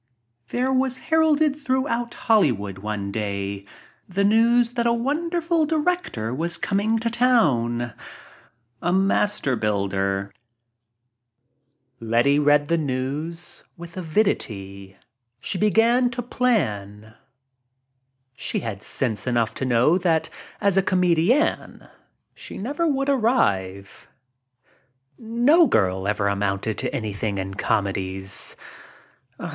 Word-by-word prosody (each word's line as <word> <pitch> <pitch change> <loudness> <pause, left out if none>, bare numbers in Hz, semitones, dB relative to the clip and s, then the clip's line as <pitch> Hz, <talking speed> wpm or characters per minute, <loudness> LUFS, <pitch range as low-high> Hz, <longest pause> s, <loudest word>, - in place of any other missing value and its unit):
There 255 - -1
was 260 -1 +1
heralded 315 -1 +2
throughout 260 -4 -2
Hollywood 120 - +1
one 100 -1 -4
day 100 -1 -4 0.4
the 195 +2 0
news 230 +3 +3
that 235 -1 0
a - - +3
wonderful 325 +6 0
director 310 - -1
was 165 +5 -1
coming 205 +3 0
to 230 +1 -1
town 125 - +2 0.5
— 120 0 -35
a 175 - 0
master 195 -6 +2
builder. 100 -2 -1 1.7
Letty 120 +5 +2
read 145 0 +3
the 170 +1 +1
news 145 +5 -4
with 170 0 -11
avidity. 100 - -2 0.4
She 185 - -4
began 230 +4 +3
to 245 0 -5
plan. 110 - -1 1.2
She - - -3
had 110 -4 -5
sense 110 -3 -3
enough 115 -2 +1
to 130 - -4
know 130 +8 +3
that 165 -3 0 0.3
as 200 -1 +2
a - - +6
comedienne 185 - +1 0.5
she - - -10
never 290 - -2
would 275 -2 0
arrive. 100 - 0 1.1
No 245 +9 +4
girl 95 -1 +1
ever 105 -1 0
amounted 100 +1 -1
to 130 - -2
anything 105 -5 -3
in 95 0 -4
comedies. 95 -1 -2
160 Hz, 110 wpm, -23 LUFS, -, 1.7 s, a